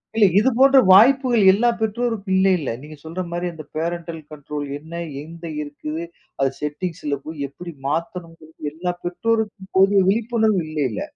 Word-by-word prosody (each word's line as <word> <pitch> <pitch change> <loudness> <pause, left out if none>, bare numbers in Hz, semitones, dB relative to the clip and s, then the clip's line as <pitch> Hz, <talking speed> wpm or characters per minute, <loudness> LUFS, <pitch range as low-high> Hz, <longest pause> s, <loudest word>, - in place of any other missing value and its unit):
இல்ல, 220 -2 +5
இது 240 +5 +3
போன்ற 270 +1 +7
வாய்ப்புகள் 245 +3 +6
எல்லா 225 +5 +3
பெற்றோருக்கும் 220 -3 -1
இல்லை 190 0 +4
இல்ல. 145 - -4
நீங்க 150 +2 -10
சொல்ற 165 +3 -5
மாரி 175 +1 -2
அந்த 160 -1 -9
பேரண்டல் 170 0 -3
கண்ட்ரோல் 150 0 -6
என்ன? 160 +3 -7 0.2
எங்க 165 +2 -12 0.2
இருக்குது? 150 +2 -6 0.4
அது 135 -1 +3
செட்டிங்ஸ்ல 150 -1 -3
போய் 155 -3 -5
எப்படி 170 +3 -9
மாத்தணும்ங்கறது 165 -1 -5
எல்லா 175 +3 -3
பெற்றோருக்கும் 210 +1 -2
போதிய 195 +1 +5
விழிப்புணர்வு 220 -2 +1
இல்லை 150 -3 -1
இல்ல? 105 - -4
175 Hz, 150 wpm, -21 LUFS, 155-210 Hz, 0.4 s, போன்ற